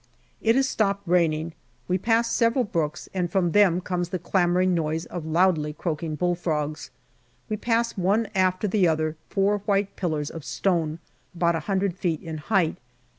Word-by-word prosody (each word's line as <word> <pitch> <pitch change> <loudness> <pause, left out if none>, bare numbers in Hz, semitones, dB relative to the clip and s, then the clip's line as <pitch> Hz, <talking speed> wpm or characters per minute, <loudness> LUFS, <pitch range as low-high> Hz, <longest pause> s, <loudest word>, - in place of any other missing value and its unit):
It 225 +1 +3
has 270 0 +3
stopped 200 -5 0
raining; 165 -2 +1 0.3
we 185 +1 +1
pass 230 +3 +2
several 235 +2 +2
brooks, 165 -8 -2
and 180 -2 -1
from 175 -3 +1
them 185 -3 +4
comes 180 -1 -2
the 185 - -2
clamouring 180 +1 +2
noise 160 -1 -1
of 170 -3 -6
loudly 160 -2 +2
croaking 155 0 -3
bull 175 +3 +1
frogs. 155 -4 -3 0.6
We 215 - 0
pass 230 +1 0
one 205 +4 +1
after 185 +1 +1
the 195 -2 +3
other 155 -1 0
four 200 +1 +1
white 200 -1 +1
pillars 155 -5 -2
of 165 - -8
stone, 165 -4 0 0.4
about 170 0 +2
a - - -1
hundred 190 -2 0
feet 165 -5 -1
in 160 -2 -5
height. 175 0 +1
180 Hz, 170 wpm, -25 LUFS, 160-200 Hz, 0.6 s, them